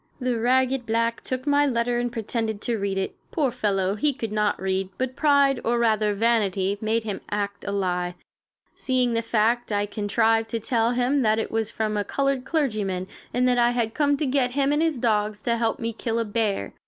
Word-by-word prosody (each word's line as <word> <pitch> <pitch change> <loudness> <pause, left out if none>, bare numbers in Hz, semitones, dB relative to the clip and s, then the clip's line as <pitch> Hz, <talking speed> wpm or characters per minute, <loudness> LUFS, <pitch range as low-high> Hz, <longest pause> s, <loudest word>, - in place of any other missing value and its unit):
The 250 -3 -1
ragged 255 +1 +2
black 230 +1 0
took 255 0 -4
my 290 0 +3
letter 240 -1 0
and 240 0 -1
pretended 225 -1 -2
to 235 -2 -1
read 195 -1 -2
it. 190 - -2
Poor 285 -6 0
fellow, 200 -5 0
he 280 +8 +1
could 230 -5 -5
not 210 -1 0
read, 190 0 -1
but 260 0 -2
pride, 280 -3 +3
or 240 +1 +1
rather 215 -3 +2
vanity, 200 -3 +1
made 225 +1 0
him 205 -3 -4
act 200 -1 -3
a 200 - -2
lie. 180 -3 -1 0.6
Seeing 255 -2 0
the 230 - +1
fact, 230 +1 +1
I 205 0 +1
contrived 225 +2 +1
to 230 - -2
tell 230 +1 +1
him 250 +3 +1
that 215 -2 +3
it 225 - -2
was 225 -1 -1
from 215 -1 -2
a 205 - 0
colored 275 +2 -1
clergyman, 210 - -1 0.2
and 250 +1 +2
that 245 -1 +3
I 240 0 +4
had 235 -2 -1
come 285 -1 +2
to 305 - -1
get 255 -2 +1
him 280 0 +2
and 295 +1 +2
his 320 -4 +1
dogs 215 -3 0
to 235 - +1
help 230 -1 0
me 230 -2 -3
kill 225 +1 -2
a 230 - 0
bear. 205 - -1
230 Hz, 210 wpm, -24 LUFS, 210-250 Hz, 0.6 s, I